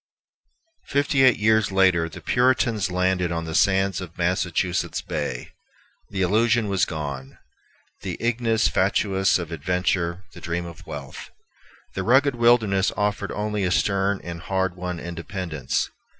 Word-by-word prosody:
Fifty 140 -1 +1
eight 130 -3 +6
years 110 -1 +2
later 95 -4 +3
the 75 - -10
Puritans 120 -5 +2
landed 90 -1 0
on 85 -1 -2
the 80 - -5
sands 95 0 +2
of 85 -3 -9
Massachusetts 90 0 0
Bay. - - -4 0.6
The 95 -2 -1
illusion 110 +3 +2
was 95 -2 +2
gone, 70 -4 -6 0.6
the 90 -2 -4
ignis 115 -5 +1
fatuus 95 +2 +2
of 85 -2 -6
adventure, 90 +2 -1
the - - -12
dream 85 0 -3
of 85 -2 -11
wealth. - - -8 0.6
The 95 - -3
rugged 130 +7 +4
wilderness 115 -5 +3
offered 105 -1 -1
only 105 -1 -2
a 90 - +1
stern 100 +1 +1
and 85 -1 -7
hard 95 0 -1
won 90 -1 -5
independence. 85 -4 -3
95 Hz, 135 wpm, -24 LUFS, 85-105 Hz, 0.6 s, eight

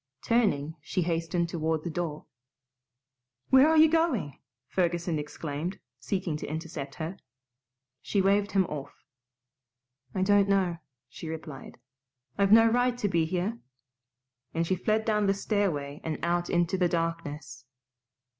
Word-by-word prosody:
Turning, 190 -11 +1
she 180 +5 -1
hastened 170 +1 0
toward 160 -1 -1
the 170 - -3
door. 155 -2 -4 1.3
"Where 265 +3 +7
are 320 - +4
you 315 +1 +8
going?" 310 - 0 0.3
Ferguson 170 -3 0
exclaimed, 150 +4 -4 0.2
seeking 155 +5 -2
to - - -6
intercept 155 -2 -5
her. 165 +4 -5 0.8
She 200 - -1
waved 200 +1 +2
him 190 -2 +4
off. 145 -5 -8 1.1
"I 185 - +1
don't 200 0 +4
know," 185 -3 +2 0.3
she 160 +6 -8
replied. 155 -4 -8 0.6
"I've 200 0 +2
no 225 +1 +8
right 245 +1 +2
to 210 - 0
be 170 -4 +2
here," 185 +7 -2 1.0
and 165 +1 +1
she 185 - +1
fled 215 +4 0
down 210 -2 +2
the 195 - +3
stairway 170 -9 -1
and 160 -2 -2
out 175 0 0
into 175 +2 +1
the 180 -1 +3
darkness. 160 -6 -3
175 Hz, 135 wpm, -28 LUFS, 160-200 Hz, 1.3 s, you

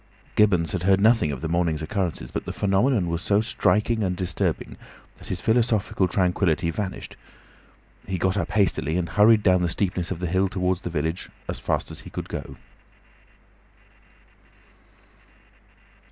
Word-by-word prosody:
Gibbons 90 -6 +3
had 95 - -2
heard 95 +1 +3
nothing 110 -7 +4
of 70 - -5
the 80 - -2
morning's 80 -2 0
occurrences, 90 -1 -3
but - - -4
the - - -4
phenomenon 100 +1 +1
was 85 0 -2
so 100 +2 +2
striking 110 0 +1
and 90 -2 -1
disturbing 90 -1 -2 0.4
that - - -13
his - - -3
philosophical 110 -4 +1
tranquillity 90 -2 +1
vanished; 95 +3 -5 0.9
he 95 - -2
got 95 +2 0
up 100 - -1
hastily, 90 -5 +1
and 85 -2 -2
hurried 105 +1 +5
down 90 -2 +4
the 90 - +1
steepness 90 -1 -1
of 90 - -4
the 90 - -3
hill 95 +3 +1
towards 90 -1 -1
the - - -4
village, 80 +2 -3 0.2
as - - -4
fast - - -2
as - - -8
he - - -11
could - - -6
go. 70 - -6
95 Hz, 155 wpm, -24 LUFS, 85-105 Hz, 0.9 s, hurried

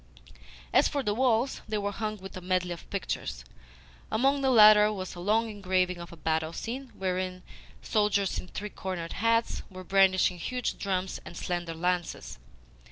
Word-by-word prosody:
As - - +5
for 280 -1 -2
the 210 - 0
walls, 245 +2 +1
they 215 0 -1
were 205 0 -1
hung 215 +1 -3
with 190 -1 -10
a 185 - -6
medley 180 0 0
of 170 - -8
pictures. - - -4 0.7
Among 275 +4 +2
the 265 - +2
latter 215 -3 +8
was 185 -3 -5
a 175 - -9
long 215 +5 +2
engraving 185 -4 0
of 170 - -9
a 170 - -11
battle 160 +1 -1
scene, 255 +6 -5
wherein 185 -1 -2 0.4
soldiers 205 -3 +1
in - - -8
three 210 +3 -6
cornered 175 -3 -5
hats 230 +1 +1
were 185 -1 -9
brandishing 185 -1 +3
huge 250 +7 -3
drums 190 -1 -2
and 170 - -10
slender 175 -2 -3
lances. 175 - -2
190 Hz, 165 wpm, -29 LUFS, 180-215 Hz, 0.7 s, latter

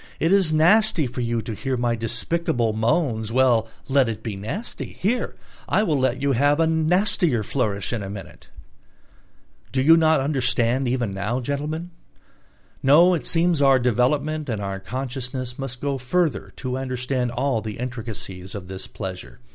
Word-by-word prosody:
It 165 - +2
is 195 -5 +4
nasty 170 +2 +4
for 125 0 -4
you 115 -1 -1
to 115 - -5
hear 130 +4 -2
my 120 -1 +1
despicable 115 +1 -1
moans: 110 -1 0
well, 120 -3 +3 0.2
let 135 -3 +3
it 110 - -5
be 110 -4 -4
nasty; 115 - -5
here 235 +6 -1 0.3
I 215 - +3
will 155 -9 +1
let 130 - +1
you 140 +1 +1
have 145 +4 +3
a 165 - +4
nastier 160 - +2
flourish 105 -3 -1
in 115 - -2
a 95 - -5
minute...." 100 -1 -10 1.3
You 130 - +2
do 165 +4 +7
not 160 -2 +4
understand 130 -2 +1
even 120 -4 0
now, 105 +6 -2
gentlemen? 150 +6 -3 0.9
No, 165 +7 +6
it 170 - -2
seems 170 -2 +2
our 135 -1 +6
development 135 +5 0
and 110 -3 -2
our 100 -1 -4
consciousness 125 +3 -5
must 130 -2 -5
go 140 -1 -1
further 155 +6 0
to 130 0 -3
understand 125 -1 -2
all 125 -1 0
the 105 -1 -6
intricacies 110 -6 -6
of 95 -3 -7
this 95 0 -6
pleasure. 90 -11 -7
130 Hz, 165 wpm, -23 LUFS, 115-150 Hz, 1.3 s, do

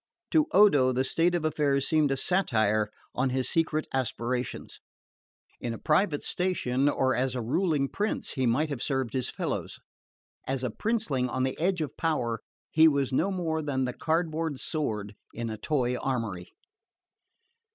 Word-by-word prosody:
To 310 -1 +4
Odo 150 -11 +6
the 130 +1 +1
state 170 +6 +2
of 165 -2 -1
affairs 145 -3 +1
seemed 155 -3 +3
a 135 - 0
satire 110 - +1 0.2
on 130 +1 +1
his 130 0 -1
secret 160 -1 0
aspirations. 125 -1 -2 0.8
In 115 -1 -3
a - - -7
private 155 - +1
station 145 -7 0
or 130 -2 +1
as 130 0 0
a 125 - -1
ruling 145 +2 +1
prince 210 +9 -2
he 130 -3 0
might 145 +7 +1
have 140 -5 -4
served 130 -4 -1
his 130 -2 0
fellows: - - -4 0.7
as 135 -1 -1
a 125 - -1
princeling 155 - 0
on 130 +2 -1
the 130 0 0
edge 180 +1 +1
of 145 -3 -4
power 120 -9 -1 0.3
he 160 +1 +7
was 140 -3 +1
no 170 +9 +2
more 165 -4 -1
than 135 -3 -1
the 125 - -3
cardboard 160 -3 -1
sword 110 -12 -2 0.2
in 115 -1 -3
a 110 - -5
toy 125 -5 0
armoury. 115 -10 -3
135 Hz, 160 wpm, -28 LUFS, 125-160 Hz, 0.8 s, he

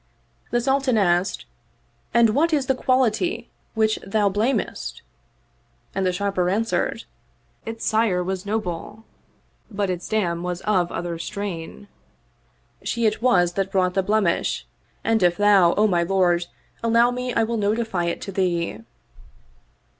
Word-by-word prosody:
The 240 - +1
Sultan 265 -1 +1
asked, 180 -1 +1 0.7
"And 235 -2 +4
what 315 +8 +2
is 285 -3 +2
the 265 - +2
quality 255 - 0 0.2
which 220 -1 +2
thou 205 +1 +1
blamest?" 215 +7 -2 0.9
and 190 -1 0
the - - +2
Sharper 185 -1 0
answered, 225 +4 -1 0.3
" - - -40
Its 225 0 -5
sire 215 -5 +2
was 185 0 -3
noble, 205 0 -4 0.7
but 200 -3 -1
its 175 -1 -5
dam 175 -6 0
was 180 0 -4
of 185 -5 +1
other 170 -1 -4
strain: 170 - -6 1.0
she 235 0 -1
it 215 0 +1
was 180 -8 +3
that 195 +1 -2
brought 185 -1 +1
the 195 - +2
blemish 200 -3 0 0.4
and 225 -1 +2
if 175 -1 +3
thou, 200 -4 +5
O 210 - +3
my 180 -5 +2
lord, 175 -1 +2 0.4
allow 230 +1 +4
me 250 0 -3
I 230 - +3
will 230 +1 -1
notify 210 -3 0
it 170 - -2
to 195 - -6
thee." 175 - -1
200 Hz, 145 wpm, -23 LUFS, 180-225 Hz, 1.0 s, thou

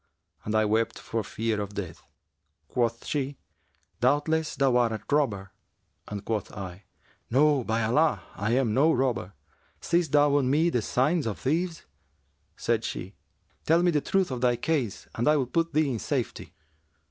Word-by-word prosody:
and 110 - -1
I 110 0 +4
wept 110 +2 +1
for 115 -1 -3
fear 110 +1 -2
of 100 0 -6
death. 95 -6 -6 0.7
Quoth 115 -2 -1
she, 140 -2 -2 0.6
'Doubtless, 150 +5 +1
thou 135 -3 +3
art 120 -2 +3
a 110 - -3 0.2
robber;' 100 -10 0 0.6
and 100 -1 -6
quoth 110 -3 -2
I, 95 -1 -8 0.4
'No, 140 +1 +3
by 115 0 0
Allah, 150 +8 +2
I 105 +3 -1
am 125 -4 +2
no 150 +6 +4
robber. 125 - 0 0.5
Seest 170 -3 0
thou 145 -1 +5
on 130 -3 +1
me 160 +5 +3
the 120 - +1
signs 145 +6 +1
of 105 - -3
thieves?' 165 +4 -1 0.7
Said 115 -1 0
she, 90 +3 -5 0.5
'Tell 165 +2 +4
me 175 - +4
the 150 -3 +1
truth 190 -2 +1
of 125 -2 -3
thy 125 -1 +3
case 135 -7 -2
and 120 - -1
I 150 0 +5
will 135 - +1
put 165 +6 0
thee 150 -2 +2
in 115 - -2
safety.' - - -3
125 Hz, 170 wpm, -27 LUFS, 110-150 Hz, 0.7 s, thou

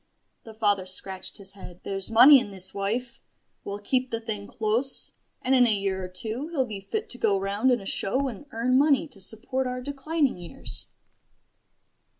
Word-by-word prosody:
The 225 -1 -11
father 205 -4 +1
scratched 185 0 +1
his 195 -1 -8
head. 180 -3 -12
"There's 195 0 -4
money 260 +5 +8
in 245 - -6
this, 190 -1 0
wife. 230 +5 -3 0.4
We'll 200 0 -5
keep 250 +5 -1
the 230 - -3
thing 215 -3 -5
close; 230 +5 0 0.3
and 260 - +2
in 250 -2 +6
a 220 - +3
year 195 -1 -2
or - - -4
two 220 - -2
he'll 305 -6 -1
be 210 -4 -7
fit 435 - -4
to 245 - -1
go 205 -3 +2
round 200 +6 0
in 245 -1 +3
a 195 - -11
show 260 +8 0
and 255 +3 -8
earn 250 +3 +1
money 290 +2 +3
to 205 -7 -12
support 245 +6 -1
our 250 0 -4
declining 280 - -1
years." 175 - -2
225 Hz, 185 wpm, -26 LUFS, 195-260 Hz, 0.4 s, money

